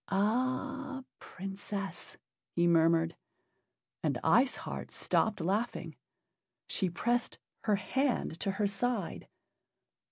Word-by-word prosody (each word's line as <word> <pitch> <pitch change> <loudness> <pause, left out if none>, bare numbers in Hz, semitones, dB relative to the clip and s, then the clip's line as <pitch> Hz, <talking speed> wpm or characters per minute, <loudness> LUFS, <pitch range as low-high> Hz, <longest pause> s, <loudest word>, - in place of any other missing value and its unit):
"Ah, 255 +6 0 0.2
Princess!" 195 +1 -6 0.4
he 175 - +4
murmured. 165 0 +4 0.9
And - - 0
Ice 255 +2 +5
Heart - - -5
stopped 220 -1 +2
laughing. 200 +8 -1 0.7
She 190 - 0
pressed 240 +7 0 0.3
her 210 -2 +4
hand 240 - 0
to - - -1
her 205 +1 +1
side. 205 0 -1
205 Hz, 95 wpm, -32 LUFS, 185-245 Hz, 0.9 s, Ice